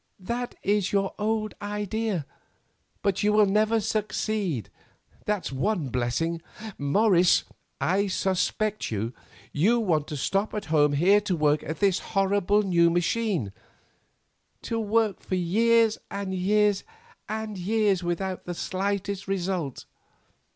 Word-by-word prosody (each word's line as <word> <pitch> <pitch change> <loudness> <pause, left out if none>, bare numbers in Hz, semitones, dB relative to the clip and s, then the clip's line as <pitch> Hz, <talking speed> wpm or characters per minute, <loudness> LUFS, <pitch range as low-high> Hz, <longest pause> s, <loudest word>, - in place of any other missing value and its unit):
That 240 +5 -3
is 200 -1 +1
your 195 -1 +1
old 215 0 -1
idea, 205 -3 -2 0.8
but 200 -1 +1
you 210 - +3
will 210 0 +5
never 215 +3 +2
succeed, 210 - -2 0.5
that's 210 -7 -1
one 150 +2 -1
blessing. 125 +8 -1 0.4
Morris, 180 +4 +4 0.4
I 200 +3 +1
suspect 195 +3 -1
you; 110 +2 -3 0.4
you 215 +11 +3
want 160 -9 +1
to 150 - -5
stop 195 +10 -1
at 210 - -3
home 150 -2 +4
here 190 +8 +4
to 200 -3 -1
work 150 -1 +2
at 160 +5 -6
this 195 -2 +3
horrible 200 +1 +1
new 170 -3 +4
machine; 175 - 0 1.1
to 230 - -2
work 220 -2 +1
for 185 - -3
years, 225 +5 +3
and 200 -1 -4
years, 205 +2 +2 0.5
and 215 -1 -4
years 205 0 +1
without 180 +2 -3
the 175 - -4
slightest 200 +2 -2
result. 180 -7 -2
195 Hz, 125 wpm, -26 LUFS, 175-210 Hz, 1.1 s, will